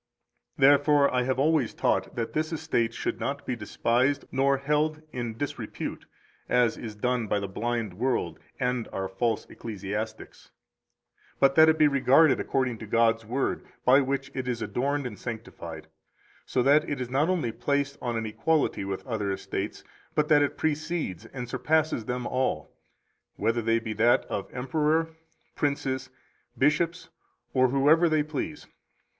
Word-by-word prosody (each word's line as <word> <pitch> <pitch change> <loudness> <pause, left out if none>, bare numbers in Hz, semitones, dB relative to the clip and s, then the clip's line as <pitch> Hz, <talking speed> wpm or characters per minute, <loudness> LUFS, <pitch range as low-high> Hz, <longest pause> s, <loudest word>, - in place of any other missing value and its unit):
209 135 +1 +7
Therefore 145 -2 +3
I 125 - +2
have 130 0 0
always 150 -3 +2
taught - - 0
that 115 -1 -3
this 155 +2 -1
estate 155 -8 0
should 115 - -3
not 140 +5 -3
be 125 - -2
despised 120 +5 0
nor 135 +1 +2
held 150 +3 0
in 120 -3 -4
disrepute, 140 -5 -5 0.4
as 125 -2 +3
is 110 -2 -7
done 125 +1 -1
by 105 - +1
the 100 - -4
blind 115 0 -2
world 125 +6 -1 0.2
and 125 -2 -1
our 95 0 -3
false 110 +4 -1
ecclesiastics, 110 0 -6 0.9
but 135 0 +5
that 160 +2 +7
it 160 - +3
be 155 -1 +6
regarded 140 +1 +4
according 130 -4 -1
to 110 - -8
God's 115 0 +2
Word, 130 +4 -1 0.2
by 135 +3 +6
which 135 0 -2
it 130 -1 -4
is 120 -2 -1
adorned 140 +2 -1
and 105 -6 -6
sanctified, 85 -9 -7 0.6
so 125 - +1
that 145 +3 +4
it 145 - -2
is 125 -1 -4
not 145 +6 +2
only 165 -11 0
placed 140 +4 -1
on 120 -2 -2
an 115 - -2
equality 140 +5 0
with 95 -1 -4
other 110 -6 -2
estates, 95 - -4 0.3
but 150 0 +1
that 150 -1 +6
it 145 - 0
precedes 155 - -2
and 125 -2 -6
surpasses 140 0 0
them 125 +1 -3
all, 130 -13 -1 0.6
whether 115 +3 0
they 115 +1 +2
be 115 -1 -4
that 115 +3 +3
of 100 - -5
emperor, 155 +5 0 0.5
princes, 135 -2 -1 0.5
bishops, 165 +5 +1 0.4
or 130 -1 +4
whoever 150 +6 +4
they 155 -1 +2
please. 150 0 -5
130 Hz, 160 wpm, -27 LUFS, 115-145 Hz, 0.9 s, 209